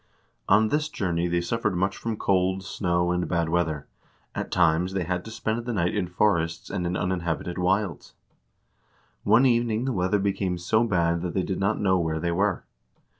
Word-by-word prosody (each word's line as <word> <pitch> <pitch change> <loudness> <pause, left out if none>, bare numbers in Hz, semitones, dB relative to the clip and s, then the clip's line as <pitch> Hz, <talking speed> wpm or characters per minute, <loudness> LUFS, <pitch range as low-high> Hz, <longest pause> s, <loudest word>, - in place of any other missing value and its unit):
On 110 +2 +5
this 150 +3 0
journey 90 - -1
they 85 0 0
suffered 100 +2 -1
much 95 +2 0
from 115 -2 -4
cold, 95 -1 +1
snow, 85 -2 0
and 90 0 0
bad 85 -2 0
weather; 80 -4 0 0.5
at - - -4
times 90 +1 +2
they 95 -2 0
had 90 +1 -2
to - - -7
spend 110 +1 -2
the 120 0 -3
night 90 -4 0
in 100 -4 -1
forests 85 -3 0
and 90 - -2
in 90 - -1
uninhabited 90 -1 -2
wilds. 95 +1 -1 1.1
One 125 +4 +4
evening 120 -1 +2
the 135 - 0
weather 95 +1 +1
became 95 -2 -1
so 110 +6 +2
bad 85 -5 +1
that 90 -1 -4
they 95 - +1
did 95 - -3
not 100 +3 +1
know 95 -2 +2
where 80 -2 -1
they 85 +1 -1
were. 95 +2 0
90 Hz, 185 wpm, -26 LUFS, 85-105 Hz, 1.1 s, On